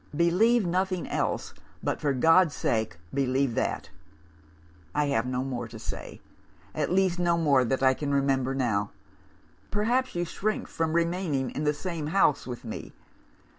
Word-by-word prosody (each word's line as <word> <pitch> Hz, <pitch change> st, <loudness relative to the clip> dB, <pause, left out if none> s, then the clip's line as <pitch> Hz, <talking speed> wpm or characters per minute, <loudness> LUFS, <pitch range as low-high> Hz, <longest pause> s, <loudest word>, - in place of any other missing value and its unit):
Believe 195 Hz, +8 st, +3 dB
nothing 185 Hz, 0 st, 0 dB
else, -, -, -2 dB, 0.3 s
but, -, -, -1 dB
for 145 Hz, -, +1 dB
God's 165 Hz, +5 st, +4 dB
sake, 110 Hz, -6 st, -1 dB, 0.2 s
believe 135 Hz, -1 st, +1 dB
that! -, -, -2 dB, 1.0 s
"'I 150 Hz, -, +2 dB
have 135 Hz, -5 st, +1 dB
no 125 Hz, 0 st, -1 dB
more 125 Hz, -3 st, -4 dB
to 115 Hz, -, -10 dB
say 110 Hz, -, -7 dB, 0.5 s
at -, -, -1 dB
least 185 Hz, -1 st, +2 dB
no 170 Hz, -1 st, +2 dB
more 145 Hz, -6 st, +4 dB
that 130 Hz, +2 st, -1 dB
I 130 Hz, 0 st, +6 dB
can 140 Hz, +1 st, -3 dB
remember 135 Hz, -1 st, +1 dB
now. 110 Hz, -6 st, 0 dB, 0.8 s
Perhaps, 240 Hz, +4 st, 0 dB
you 175 Hz, 0 st, 0 dB
shrink 215 Hz, +5 st, -2 dB
from 160 Hz, -1 st, -2 dB
remaining 170 Hz, -6 st, 0 dB
in 150 Hz, -, -3 dB
the 150 Hz, -, +4 dB
same 165 Hz, -3 st, -4 dB
house 150 Hz, -5 st, +2 dB
with 125 Hz, -1 st, -6 dB
me? 110 Hz, -, -7 dB
150 Hz, 155 wpm, -27 LUFS, 130-175 Hz, 1.0 s, I